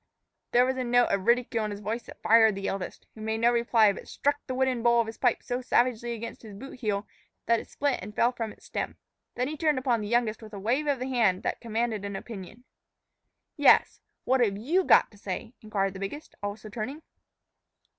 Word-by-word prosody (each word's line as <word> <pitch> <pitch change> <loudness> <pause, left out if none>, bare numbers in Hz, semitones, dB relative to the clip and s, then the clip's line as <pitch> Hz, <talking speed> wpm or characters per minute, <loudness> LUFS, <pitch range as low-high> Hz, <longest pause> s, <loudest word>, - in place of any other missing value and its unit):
There 245 +1 +4
was 260 0 -1
a 255 - -1
note 245 0 +3
of 195 +1 -1
ridicule 235 -2 +2
in 215 - -2
his 205 -1 -6
voice 215 +3 -3
that - - -13
fired 220 -2 +6
the 195 0 -3
eldest, 195 -2 -5
who 220 - -12
made 220 0 -1
no 235 +1 +4
reply, 235 -3 +4
but - - -10
struck 285 0 0
the 255 - -3
wooden 260 -2 +1
bowl 235 0 +4
of 230 - +3
his 225 0 -8
pipe 245 -3 +2
so 245 +1 -2
savagely 240 -1 +1
against 230 +1 -7
his 215 -3 -10
boot 260 +4 -10
heel 210 -3 -1 0.4
that 230 0 +3
it - - -11
split 285 -2 0
and 210 +3 -8
fell 240 - +3
from 230 -3 -4
its - - -17
stem. - - -4 0.4
Then 250 +1 0
he 305 - -4
turned 305 -2 +1
upon 250 -4 +1
the 210 - -4
youngest 235 -1 +1
with 220 -1 -12
a - - -6
wave 250 +9 0
of 285 -2 +2
the 255 +1 -4
hand 220 -8 +2
that - - -2
commanded 230 -2 -2
an 200 -1 -4
opinion. 215 +2 -8 0.9
"Yes, - - +5 0.2
what've 240 -6 +2
you 320 - +1
got - - +5
to 205 - -18
say?" 200 +4 -5
inquired 195 -3 -1
the 190 - -8
biggest, 200 +11 -6
also 205 +1 -5
turning. 245 +9 -5
230 Hz, 220 wpm, -28 LUFS, 210-250 Hz, 0.9 s, fired